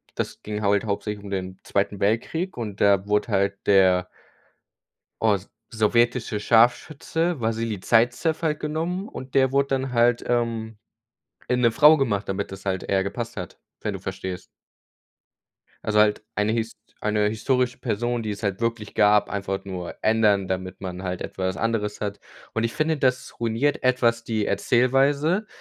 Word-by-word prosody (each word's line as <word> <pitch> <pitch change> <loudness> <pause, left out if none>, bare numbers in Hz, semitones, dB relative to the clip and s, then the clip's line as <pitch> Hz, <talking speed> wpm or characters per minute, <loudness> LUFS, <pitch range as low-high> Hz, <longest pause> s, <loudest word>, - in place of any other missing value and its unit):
das - - -4
ging 105 0 -4
halt 100 -1 +2
halt - - -7
hauptsächlich 105 0 -3
um 100 - -8
den 95 -1 -4
Zweiten 100 0 -1
Weltkrieg 140 - -1
und 105 -4 -5
da 100 -1 +4
wurde 105 +3 +1
halt 100 -1 +1
der 95 -2 +4 1.1
os 100 -3 +1 0.2
sowjetische 120 +1 +2
Scharfschütze 140 +9 +2
Wassili 110 -3 -2
Saizew 120 - +2
halt 150 -2 0
genommen. 165 +6 -2
Und 130 0 -9
der 130 -1 +4
wurde 140 0 +2
dann 135 -1 -1
halt, 120 0 +3
ähm, 115 -2 -1 0.7
in 125 0 +1
'ne 115 - +5
Frau 150 +6 +7
gemacht, 110 -8 -1
damit 95 +1 -3
das 95 +1 -10
halt 95 -1 -1
eher 95 -1 +1
gepasst 115 +4 -5
hat, 90 -3 -7 0.2
wenn 105 - -3
du 95 - -4
verstehst. 95 -1 -5 1.4
Also 105 0 +3
halt 105 0 +3
eine 105 +1 +1
hist 115 -1 -2 0.2
eine 105 0 +1
historische 125 +3 0
Person, 120 0 -2
die 105 - -2
es 105 +2 -6
halt 100 -1 -2
wirklich 115 -3 -2
gab, 105 0 +4
einfach 100 -1 -3
nur 90 -3 -6
ändern, 105 -3 +3
damit 95 0 -4
man 95 0 -6
halt 90 0 -3
etwas 95 0 -3
anderes 105 -2 -1
hat. 100 -1 -3 0.4
Und 115 - 0
ich 115 - -1
finde, 155 +1 0
das 130 -2 -1
ruiniert 120 +6 0
etwas 120 -2 +2
die 110 -2 -1
Erzählweise. 140 - +2
110 Hz, 160 wpm, -24 LUFS, 100-125 Hz, 1.4 s, Frau